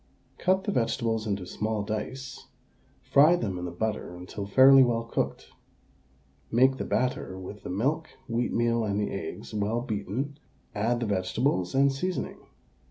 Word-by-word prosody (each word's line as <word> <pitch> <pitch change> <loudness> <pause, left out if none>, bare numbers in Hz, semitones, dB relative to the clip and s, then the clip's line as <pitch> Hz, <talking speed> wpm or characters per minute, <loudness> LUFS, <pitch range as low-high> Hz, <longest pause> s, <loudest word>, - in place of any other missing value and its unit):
Cut 190 +1 +2
the 205 - -1
vegetables 115 - 0
into 100 -3 -2
small 105 +3 -2
dice; 130 +6 -5 0.6
fry 150 +5 +6
them 100 - -2
in 90 - -4
the 90 - -4
butter 105 -1 -3
until 95 +3 -7
fairly 135 +5 +8
well 120 -2 +2
cooked. 115 - -3 1.0
Make 130 +3 +4
the - - -3
batter 125 -7 -1
with 95 +2 -8
the - - -7
milk, 140 - 0 0.2
wheatmeal, 115 -1 +1
and 100 -1 -1
the 105 - -1
eggs - - -6
well 105 +3 0
beaten; 120 +6 -3 0.3
add 115 +4 0
the - - 0
vegetables 95 0 0
and 140 +1 +5
seasoning. 180 +7 -3
115 Hz, 150 wpm, -28 LUFS, 100-130 Hz, 1.0 s, fairly